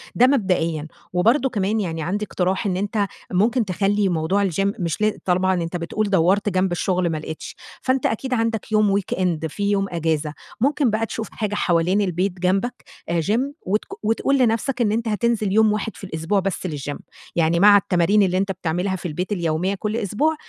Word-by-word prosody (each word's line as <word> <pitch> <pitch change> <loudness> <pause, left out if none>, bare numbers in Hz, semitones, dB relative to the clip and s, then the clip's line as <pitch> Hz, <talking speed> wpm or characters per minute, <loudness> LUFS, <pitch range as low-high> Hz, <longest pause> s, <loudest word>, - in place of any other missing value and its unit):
ده 250 - +6
مبدئيًا. 175 - +1 0.3
وبرضه 235 +9 +3
كمان 210 -1 0
يعني 165 -3 -3
عندي 205 +6 -2
اقتراح 185 +2 -1
إن 185 -3 0
أنتَ 205 +1 0 0.2
ممكن 225 +6 +2
تخلِّي 195 +1 +1
موضوع 185 +4 +1
الgym 195 +4 0
مش 170 +1 -2
لا 215 0 +1
طبعًا 185 +1 +2
أنتَ 170 +2 -3
بتقول 200 +5 -2
دوَّرت 195 +3 +3
جنب 185 0 +1
الشغل 180 0 0
ما 160 - -2
لقيتش، 155 +1 -7 0.3
فأنتَ 260 0 0
أكيد 255 +4 -1
عندَك 225 -2 -1
يوم 210 -2 +3
weekend 180 -4 -1
في 200 +5 -1
يوم 195 -1 +1
إجازة، 160 -3 -1 0.3
ممكن 280 0 +2
بقى 220 +1 0
تشوف 225 -1 -5
حاجة 210 -2 -3
حوالين 175 +2 +2
البيت 185 0 -1
جنبك، 195 +7 0 0.3
آآ 170 -1 +1
gym 210 +8 +1 0.3
وتك 210 - 0 0.2
وتقول 225 +5 +2
لنفْسَك 245 +1 +1
إن 210 - +2
أنتَ 230 +2 -1
هتنزِل 215 -1 0
يوم 215 +1 +4
واحد 215 +1 -3
في - - -14
الأسبوع 180 +2 -1
بس 190 -1 -2
للgym 145 -3 -4 0.4
يعني 170 0 +2
مع 205 +2 +8
التمارين 200 +1 +3
اللي 185 -1 +1
أنتَ 195 +1 0
بتعملها 180 +2 -2
في 180 -1 -5
البيت 180 +5 -4
اليومية 175 +1 0
كل 210 +3 -2
أسبوع، 235 - 0
195 Hz, 185 wpm, -22 LUFS, 175-215 Hz, 0.4 s, مع